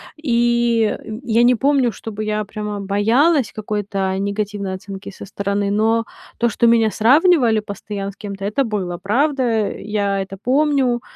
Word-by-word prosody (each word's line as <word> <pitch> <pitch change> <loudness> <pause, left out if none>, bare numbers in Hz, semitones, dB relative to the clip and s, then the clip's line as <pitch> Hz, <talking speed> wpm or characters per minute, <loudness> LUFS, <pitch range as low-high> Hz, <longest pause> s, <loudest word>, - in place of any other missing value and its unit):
И, 235 -5 +1
э, 220 0 -8
я 230 -2 +2
не 245 +1 +5
помню, 270 -1 +2
чтобы 215 +1 -6
я 215 0 -1
прямо 210 0 -5
боялась 225 - +2
какой-то 205 -3 -3
негативной 200 -1 -3
оценки 195 +1 -8
со 195 - -10
стороны, 200 0 -2
но 225 +2 +2 0.3
то, 235 - +2
что 235 +2 +2
меня 225 -2 +4
сравнивали 255 - +4
постоянно 200 -1 -6
с 195 - -20
кем-то- 200 -2 -7
это 240 +7 0
было, 195 -6 -3
правда. 245 -1 +1
Я 200 -1 -2
это 195 0 -7
помню. 260 +1 +1
215 Hz, 150 wpm, -19 LUFS, 200-240 Hz, 0.3 s, не